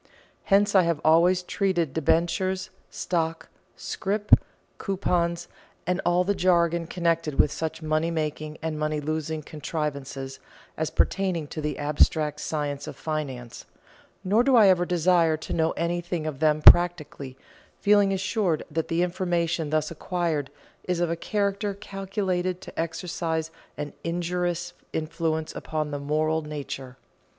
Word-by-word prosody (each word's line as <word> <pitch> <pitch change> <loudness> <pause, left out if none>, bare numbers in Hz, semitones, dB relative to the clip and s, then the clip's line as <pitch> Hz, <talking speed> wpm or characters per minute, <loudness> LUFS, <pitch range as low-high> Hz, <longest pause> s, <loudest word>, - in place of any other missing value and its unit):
Hence 200 +1 +4
I 190 - +7
have 170 -3 0
always 175 +3 +5
treated 180 -7 0
debentures, 170 +4 +1 0.2
stock, 165 -2 -2 0.3
scrip, 205 +2 -3 0.5
coupons, 175 -3 0 0.4
and 180 +2 0
all 175 +1 +3
the 200 +2 +1
jargon 170 -3 +2
connected 165 -4 0
with 145 - +5
such 160 +1 -4
money 155 +1 +1
making 155 -1 -3
and 160 -1 -2
money 155 0 0
losing 155 +1 -3
contrivances, 140 -3 -4 0.4
as 160 0 -1
pertaining 185 -5 0
to 155 - -5
the 150 0 -2
abstract 150 0 +2
science 145 -3 -3
of - - -6
finance; 135 -7 -5 0.6
nor 210 +6 +3
do 265 0 +4
I 215 -4 +7
ever 175 -1 +3
desire 170 -2 +3
to 160 - -6
know 160 -1 +2
anything 170 -1 -2
of 150 -4 -4
them 155 -1 +2
practically, 150 -6 +5 0.4
feeling 205 -1 +4
assured 195 -3 0
that 160 +1 -1
the 165 +1 +1
information 175 -3 -1
thus 155 0 0
acquired 165 -4 -2 0.3
is 180 -2 -1
of 175 -1 +1
a - - 0
character 200 +2 -1
calculated 190 -2 -2
to - - -9
exercise 165 -1 -2 0.3
an 145 -1 -5
injurious 175 0 -2 0.2
influence 160 0 -2
upon 155 -1 -3
the 145 - -3
moral 155 +2 0
nature. 140 -4 -6
165 Hz, 135 wpm, -26 LUFS, 155-180 Hz, 0.6 s, I